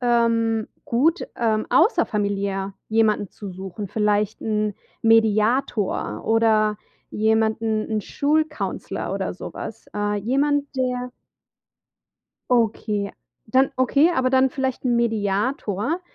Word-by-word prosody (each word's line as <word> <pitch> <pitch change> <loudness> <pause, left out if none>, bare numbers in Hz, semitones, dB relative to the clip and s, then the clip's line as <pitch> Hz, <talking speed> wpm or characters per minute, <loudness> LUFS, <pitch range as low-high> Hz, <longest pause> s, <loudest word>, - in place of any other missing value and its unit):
ähm, 230 -2 +2 0.2
gut, 310 +10 +1
ähm, 220 -2 +1
außerfamiliär 200 - +1 0.2
jemanden 215 -2 +2
zu 205 -2 -8
suchen, 190 +2 -7
vielleicht 210 +1 0
'n 210 -2 -1 0.3
Mediator 225 0 +2
oder 220 -1 +3 0.3
jemanden 220 0 +1
'n 215 -1 0
Schul-Counselor 305 +8 -2
oder - - -3
so - - -8
was. - - -7
Äh, 205 0 0
jemand, 285 +6 0
der 250 -1 -1 1.4
Okay. 215 -4 +1 0.3
Dann 260 +4 +3
okay, 280 +6 +4
aber 255 -3 +1
dann 265 0 +4
vielleicht 265 -1 -3
'n 240 -2 +2
Mediator, 220 - 0
225 Hz, 105 wpm, -23 LUFS, 210-255 Hz, 1.4 s, okay